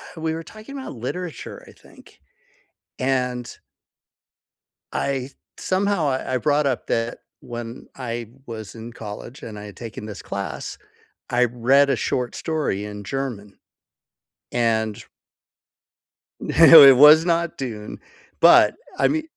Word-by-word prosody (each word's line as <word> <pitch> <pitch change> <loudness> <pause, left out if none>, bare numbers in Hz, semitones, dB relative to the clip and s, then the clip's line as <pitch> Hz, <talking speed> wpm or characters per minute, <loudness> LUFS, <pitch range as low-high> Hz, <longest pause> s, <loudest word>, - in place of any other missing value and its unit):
we 160 - -9
we 160 0 -1
were 165 +1 -5
talking 220 +9 -11
about 265 - -7
literature, 180 - -6
I - - -13
think, - - -20 0.8
and 125 -2 -1 1.4
I 135 -1 -2 0.3
somehow, 190 -5 0
I 130 0 -2
I - - +3
brought 145 +1 +1
up 130 - -2
that 115 +1 -2 0.2
when 120 0 -8
I 120 -3 -5 0.2
was 110 -2 -8
in 115 +1 -9
college 105 +3 -9
and 105 -2 -8
I 105 - -9
had 100 - -12
taken 115 -2 -8
this 105 -2 -8
class, - - -6 0.5
I 125 +1 +3
read 125 +4 +3
a - - +2
short 125 -1 -2
story 150 - -2
in 105 -1 -8
German, 115 -5 -5 0.9
and 110 -3 0 1.4
No, 165 -2 +8
it 135 -2 +9
was 150 +4 +8
not 170 -1 0
Dune, 110 -5 -6 0.4
but, - - +6 0.2
I - - +3
mean 310 +1 -1
125 Hz, 135 wpm, -22 LUFS, 115-155 Hz, 1.4 s, it